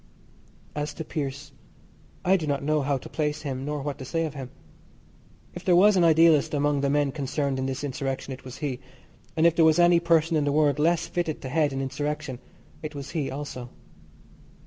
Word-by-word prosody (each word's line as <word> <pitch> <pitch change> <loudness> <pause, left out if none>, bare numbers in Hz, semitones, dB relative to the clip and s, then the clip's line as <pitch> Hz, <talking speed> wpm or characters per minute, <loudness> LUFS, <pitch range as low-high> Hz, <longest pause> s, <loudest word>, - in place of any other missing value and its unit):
As 150 0 -4
to 160 - -6
Pearse, 140 -1 -4 0.7
I 190 +2 +5
do 165 -5 -2
not 140 -1 -1
know 155 +1 +1
how 140 0 0
to - - -10
place 150 -1 -2
him, 135 -2 -4
nor 150 -1 -3
what 145 0 -4
to - - -6
say 165 +5 -1
of 155 - -5
him. 135 -3 -7 1.0
If - - -8
there 180 - +4
was 200 +3 +6
an 180 - +4
idealist 160 -2 +5
among 145 0 +1
the 140 - +1
men 145 -1 +2
concerned 140 -1 -2
in 130 - -1
this 135 +1 -4
insurrection 135 -1 -3
it 130 - -11
was 130 0 -9
he, 135 -4 -3 0.6
and 160 - +4
if 170 -1 +5
there 165 - +4
was 160 0 +5
any 175 0 +6
person 165 -1 +2
in 150 - +1
the 145 - +1
world 150 0 +2
less 170 +2 +2
fitted 170 -3 -2
to 130 - -4
head 150 +1 +2
an 135 0 -3
insurrection 145 -1 -3 0.4
it 155 -1 -6
was 140 0 -7
he 150 -5 -2
also. 135 -3 -6
145 Hz, 210 wpm, -26 LUFS, 135-160 Hz, 1.0 s, was